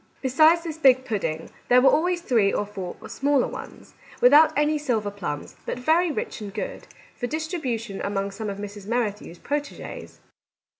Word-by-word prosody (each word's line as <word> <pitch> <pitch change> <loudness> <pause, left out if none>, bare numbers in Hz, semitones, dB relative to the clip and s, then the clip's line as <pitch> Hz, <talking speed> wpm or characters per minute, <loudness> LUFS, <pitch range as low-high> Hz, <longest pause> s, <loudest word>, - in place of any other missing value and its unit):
Besides 310 +6 +5
this 320 -2 -6
big 260 -3 +5
pudding, 165 -9 -3 0.2
there 250 - +7
were 270 - +6
always 350 +2 +1
three 225 -10 +2
or 205 - -1
four 195 -3 -7
smaller 280 -1 +1
ones - - -10 0.3
(without 295 +5 +7
any 300 +1 +2
silver 225 -8 -1
plums, 175 -8 -5
but - - -2
very 325 +7 +2
rich 295 - -4
and 205 -1 -6
good), - - -6 0.3
for 245 - -3
distribution 255 - -3
among 200 0 -2
some 210 +2 -5
of 195 - -5
Mrs. 205 -1 -8
Merrithew's 215 -6 -2
proteges. 290 +8 -5
245 Hz, 160 wpm, -24 LUFS, 205-300 Hz, 0.3 s, there